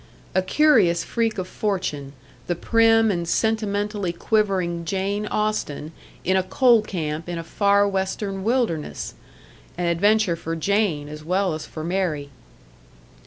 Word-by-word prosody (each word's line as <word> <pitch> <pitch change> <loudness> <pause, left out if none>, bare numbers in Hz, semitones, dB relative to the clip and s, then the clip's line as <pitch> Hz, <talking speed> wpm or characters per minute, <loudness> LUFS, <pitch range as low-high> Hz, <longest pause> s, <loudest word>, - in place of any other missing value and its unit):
A 185 - +3
curious 190 - +3
freak 225 -2 -1
of 185 -1 -3
fortune 180 -11 -3 0.3
the 175 - 0
prim 225 +3 +4
and 170 -3 -2
sentimentally 205 -2 0
quivering 185 -3 0
Jane 195 +4 -2
Austen 210 -9 -2 0.3
in 185 - +2
a 190 - +4
coal 235 +5 +4
camp 165 -5 -4
in 175 - -3
a 165 - -4
far 200 +4 +3
Western 195 0 -2
wilderness! 225 - -1 0.6
An 175 - -1
adventure 200 +2 +3
for 165 0 -4
Jane, 170 -4 0
as 150 +1 -9
well 185 +2 0
as 155 - -6
for 155 - -7
Mary! 165 -5 -2
190 Hz, 135 wpm, -23 LUFS, 170-210 Hz, 0.6 s, prim